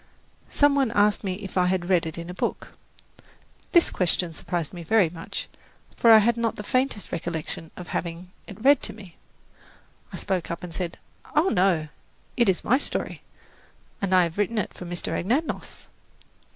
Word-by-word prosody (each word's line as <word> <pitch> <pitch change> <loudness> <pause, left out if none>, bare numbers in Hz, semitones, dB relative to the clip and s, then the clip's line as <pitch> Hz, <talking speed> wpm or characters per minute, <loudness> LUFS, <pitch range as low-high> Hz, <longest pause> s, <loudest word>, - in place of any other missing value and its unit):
Some 290 -1 +4
one 275 -3 +2
asked 205 0 +3
me 190 -2 -2
if 195 -1 -3
I 180 - +3
had 180 -1 0
read 180 -3 +3
it 160 - -6
in 170 0 -6
a 180 - -6
book. - - -3 1.0
This 345 - +5
question 175 -1 0
surprised 170 0 -3
me 175 - -7
very 180 -1 +3
much; 165 -1 -6 0.5
for 230 - +4
I 220 - +11
had 230 +2 +3
not 230 -1 0
the 210 - -6
faintest 255 -2 -1
recollection 160 -1 -4
of 180 -1 -8
having 170 +1 -4 0.2
had 200 - -9
it 215 - -12
read 280 -1 +6
to - - -3
me. 195 -6 -13 1.0
I - - -7
spoke 190 -3 -2
up 170 - -5
and 175 -2 -7
said, 175 -1 -4 0.4
"Oh, 335 +5 +4
no, 180 -5 +2 0.5
it 235 -4 +3
is 185 - +1
my 255 +5 +3
story, - - -2 0.8
and 190 -2 +2
I 180 - +6
have 170 +3 -3
written 215 +3 0
it 210 - -1
for 180 - -9
Mr. 175 0 -3
Anagnos." 255 - -2
185 Hz, 185 wpm, -25 LUFS, 175-220 Hz, 1.0 s, I